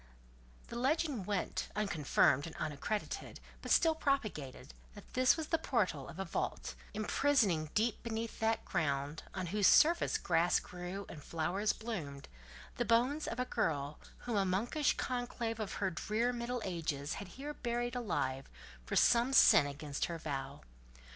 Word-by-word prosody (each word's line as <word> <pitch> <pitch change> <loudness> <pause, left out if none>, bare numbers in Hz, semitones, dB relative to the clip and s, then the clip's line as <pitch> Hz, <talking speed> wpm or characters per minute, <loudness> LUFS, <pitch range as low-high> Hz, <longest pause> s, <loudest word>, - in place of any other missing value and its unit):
The - - -7
legend 265 - 0
went, 200 -3 -1
unconfirmed 160 -7 +2
and 165 - -9
unaccredited, 155 +8 -4 0.2
but - - -7
still 325 -1 +5
propagated, 215 - -2 0.2
that - - -13
this 255 +3 +4
was 315 -2 -4
the 330 - +2
portal 200 - 0
of 170 - -10
a 195 - -3
vault, 170 - -3 0.2
imprisoning 210 - +2
deep 220 +2 +1
beneath 225 -1 -4
that 225 0 0
ground, 145 -3 -1
on 185 -1 -2
whose 210 -2 +4
surface 335 +3 +5
grass 170 0 +2
grew 180 +2 -7
and 150 - -9
flowers 175 +6 0
bloomed, 160 -12 -6 0.5
the - - +1
bones 245 +6 +2
of 230 - -4
a 250 - +1
girl 145 - -1 0.3
whom 235 -3 -1
a 200 - +3
monkish 225 +10 +1
conclave 240 -2 -3
of 210 -3 -4
the 195 -2 0
drear 220 +8 0
middle 240 0 -3
ages 155 -6 -2
had 200 - -7
here 290 +2 -5
buried 240 -2 -2
alive 135 - -2 0.3
for - - -4
some 240 +2 +4
sin 145 - +7
against 145 0 -3
her 170 - -4
vow. 140 -3 -5
205 Hz, 155 wpm, -34 LUFS, 160-240 Hz, 0.5 s, sin